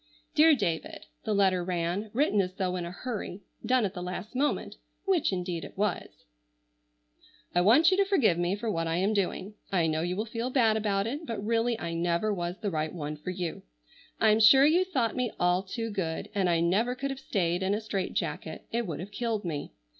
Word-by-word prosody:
"DEAR 315 Hz, 0 st, +6 dB
DAVID," 175 Hz, -, -3 dB, 0.2 s
the 215 Hz, -, 0 dB
letter 190 Hz, -3 st, +3 dB
ran,—written 200 Hz, -, 0 dB
as 185 Hz, -1 st, -4 dB
though 185 Hz, -2 st, -1 dB
in 175 Hz, -1 st, -3 dB
a -, -, -6 dB
hurry, 205 Hz, -2 st, -5 dB, 0.2 s
done 255 Hz, -3 st, +2 dB
at 195 Hz, -, -3 dB
the 180 Hz, -, -6 dB
last 180 Hz, +3 st, -5 dB
moment,—which 310 Hz, -, -1 dB
indeed 180 Hz, -3 st, -3 dB
it -, -, -10 dB
was:— 195 Hz, -, -2 dB, 1.3 s
"I 175 Hz, -, +3 dB
want 260 Hz, -, +6 dB
you 375 Hz, -, +3 dB
to 400 Hz, -, +4 dB
forgive 280 Hz, -, +3 dB
me 175 Hz, +2 st, +1 dB
for 210 Hz, +3 st, -5 dB
what 165 Hz, -4 st, -1 dB
I 165 Hz, -, 0 dB
am 195 Hz, +5 st, +1 dB
doing. 200 Hz, 0 st, -1 dB, 0.2 s
I 175 Hz, -4 st, +2 dB
know 155 Hz, 0 st, 0 dB
you 175 Hz, +2 st, -1 dB
will 215 Hz, +3 st, -2 dB
feel 230 Hz, +2 st, -3 dB
bad 235 Hz, -5 st, +3 dB
about 205 Hz, -2 st, 0 dB
it, 290 Hz, +8 st, -4 dB
but 215 Hz, -3 st, -4 dB
really 230 Hz, +1 st, +1 dB
I 165 Hz, -, -4 dB
never 170 Hz, +5 st, 0 dB
was 175 Hz, -1 st, -3 dB
the 205 Hz, -3 st, -3 dB
right 155 Hz, -1 st, -1 dB
one 150 Hz, -3 st, -5 dB
for 150 Hz, +4 st, -7 dB
you. 180 Hz, -3 st, -4 dB, 0.6 s
I'm 220 Hz, 0 st, +4 dB
sure 265 Hz, +5 st, +8 dB
you 345 Hz, +5 st, +4 dB
thought 260 Hz, -11 st, 0 dB
me 250 Hz, -3 st, -1 dB
all 180 Hz, +1 st, +3 dB
too 225 Hz, +4 st, -4 dB
good, 170 Hz, -5 st, -3 dB
and 195 Hz, -3 st, +1 dB
I 165 Hz, -1 st, +2 dB
never 210 Hz, +9 st, +2 dB
could 275 Hz, +2 st, -3 dB
have 270 Hz, -, -6 dB
stayed 180 Hz, -8 st, -1 dB
in 190 Hz, +2 st, +1 dB
a -, -, -1 dB
strait 205 Hz, -4 st, -3 dB
jacket, -, -, -3 dB
it 235 Hz, -1 st, -1 dB
would 160 Hz, -2 st, -4 dB
have 195 Hz, +3 st, -8 dB
killed 220 Hz, -2 st, -2 dB
me. 150 Hz, -4 st, -4 dB
200 Hz, 210 wpm, -29 LUFS, 175-230 Hz, 1.3 s, sure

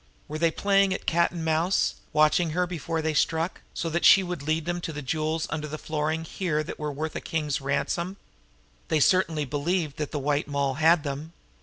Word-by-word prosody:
Were 155 Hz, +1 st, -5 dB
they 165 Hz, 0 st, +4 dB
playing 195 Hz, +2 st, +2 dB
at -, -, -7 dB
cat 170 Hz, +1 st, +3 dB
and 170 Hz, -2 st, -5 dB
mouse, 160 Hz, +4 st, +2 dB, 0.2 s
watching 155 Hz, +3 st, +3 dB
her 180 Hz, -, +3 dB
before 165 Hz, -2 st, -3 dB
they 160 Hz, 0 st, 0 dB
struck, 165 Hz, +3 st, 0 dB
so 170 Hz, -, -2 dB
that 170 Hz, +2 st, -1 dB
she 195 Hz, -, +8 dB
would 180 Hz, -4 st, -4 dB
lead 155 Hz, +2 st, -1 dB
them 175 Hz, 0 st, -2 dB
to 165 Hz, -, -4 dB
those 150 Hz, -1 st, -6 dB
jewels 155 Hz, +3 st, -1 dB
under 150 Hz, 0 st, -3 dB
the 155 Hz, +1 st, -5 dB
flooring 155 Hz, +1 st, -2 dB
here 160 Hz, -2 st, -2 dB
that 155 Hz, -, -7 dB
were 150 Hz, -1 st, -2 dB
worth 155 Hz, +3 st, -4 dB
a -, -, -3 dB
king's 150 Hz, -4 st, -2 dB
ransom? 170 Hz, +7 st, -1 dB, 0.7 s
They 155 Hz, -, +2 dB
certainly 160 Hz, -2 st, +3 dB
believed 150 Hz, +2 st, -1 dB
that 150 Hz, -2 st, -3 dB
the -, -, -4 dB
White 145 Hz, +1 st, 0 dB
Moll 140 Hz, -2 st, 0 dB
had 160 Hz, 0 st, +5 dB
them. 145 Hz, +3 st, -5 dB
160 Hz, 205 wpm, -26 LUFS, 150-170 Hz, 0.7 s, she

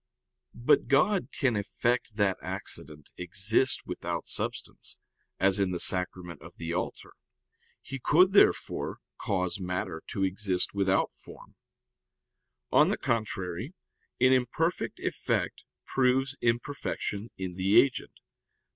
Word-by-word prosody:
But 120 Hz, -, +3 dB
God 175 Hz, -, +3 dB
can 130 Hz, -5 st, +1 dB
effect 115 Hz, +2 st, -1 dB
that 100 Hz, -3 st, +1 dB
accident 75 Hz, -1 st, -8 dB
exist 100 Hz, +8 st, +1 dB
without -, -, -4 dB
substance, -, -, -4 dB, 0.4 s
as 95 Hz, +1 st, +3 dB
in 100 Hz, -1 st, +2 dB
the 90 Hz, -1 st, -3 dB
Sacrament 90 Hz, -1 st, -1 dB
of 80 Hz, +1 st, -12 dB
the 85 Hz, 0 st, -4 dB
Altar. 90 Hz, -, -4 dB, 0.7 s
He 135 Hz, 0 st, -6 dB
could, 180 Hz, +9 st, +5 dB
therefore, 200 Hz, -, +3 dB, 0.2 s
cause 90 Hz, 0 st, -1 dB
matter 90 Hz, -3 st, -3 dB
to 95 Hz, -, -2 dB
exist 95 Hz, -1 st, 0 dB
without 95 Hz, -1 st, +1 dB
form. -, -, -14 dB, 1.2 s
On -, -, +5 dB
the -, -, 0 dB
contrary, 110 Hz, -, -2 dB, 0.4 s
An 130 Hz, +1 st, +5 dB
imperfect 130 Hz, +7 st, 0 dB
effect -, -, -2 dB, 0.2 s
proves 130 Hz, +1 st, +2 dB
imperfection 115 Hz, -3 st, -2 dB
in 95 Hz, -1 st, -4 dB
the 95 Hz, +3 st, +4 dB
agent. 135 Hz, -2 st, 0 dB
100 Hz, 115 wpm, -29 LUFS, 90-125 Hz, 1.2 s, could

